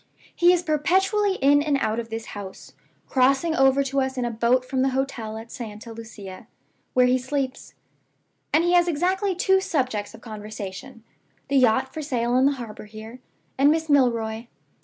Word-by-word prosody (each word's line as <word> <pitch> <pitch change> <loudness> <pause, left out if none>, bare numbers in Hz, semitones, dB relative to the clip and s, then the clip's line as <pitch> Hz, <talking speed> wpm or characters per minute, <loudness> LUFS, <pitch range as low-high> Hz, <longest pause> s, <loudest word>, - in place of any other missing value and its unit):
He 350 +1 +5
is 355 -1 +2
perpetually 380 +6 +1
in 285 +1 +5
and 290 -2 +1
out 225 -4 -1
of 230 -1 -6
this 225 0 -5
house 200 -2 -9 0.3
(crossing 275 +5 +2
over 270 0 +4
to 275 0 0
us 265 0 -2
in 250 - -1
a 240 - -2
boat 235 +3 +1
from 260 0 -1
the 270 - +2
hotel 235 -5 -3
at 225 +1 -10
Santa 225 0 -8
Lucia, 215 -4 -10 0.5
where 250 0 +5
he 250 +1 +3
sleeps); 265 0 -4 0.8
and 320 - +3
he 350 +1 +2
has 350 0 +4
exactly 370 +4 0
two 380 +2 +3
subjects 255 - -2
of - - -15
conversation 215 +1 -8 0.5
the 280 - +2
yacht 255 +1 +3
for 315 - -5
sale 245 -5 -1
in 260 +2 +4
the 285 - +2
harbor 230 -5 -8
here, 220 +3 -11 0.4
and 280 +1 +6
Miss 320 +1 0
Milroy. 230 -4 +1
260 Hz, 180 wpm, -24 LUFS, 225-290 Hz, 0.8 s, and